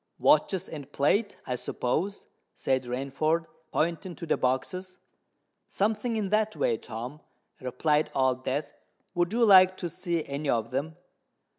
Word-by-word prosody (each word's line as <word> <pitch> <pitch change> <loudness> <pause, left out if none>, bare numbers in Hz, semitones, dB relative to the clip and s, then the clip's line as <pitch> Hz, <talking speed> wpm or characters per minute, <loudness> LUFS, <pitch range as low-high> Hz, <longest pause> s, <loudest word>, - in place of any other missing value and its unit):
"Watches 190 -3 +3
and 145 -3 -8
plate, 200 +11 +1
I 125 - -1
suppose?" 160 +11 -2 0.3
said 130 -1 +1
Rainford, 140 +6 0 0.3
pointing 170 +3 -1
to - - -7
the - - +2
boxes. 180 +9 -2 0.7
"Something 220 +3 0
in 210 -3 -1
that 215 +1 +1
way, 115 - +1
Tom," 125 +9 -7 0.4
replied 150 +4 +1
Old 130 -1 +2
Death. 140 +4 -1 0.5
"Would 175 0 +1
you 235 +1 +3
like 185 -2 +7
to 175 - -3
see 170 -1 -2
any 140 +1 -3
of 115 0 0
them?" 145 +5 -2
160 Hz, 140 wpm, -28 LUFS, 130-185 Hz, 0.7 s, like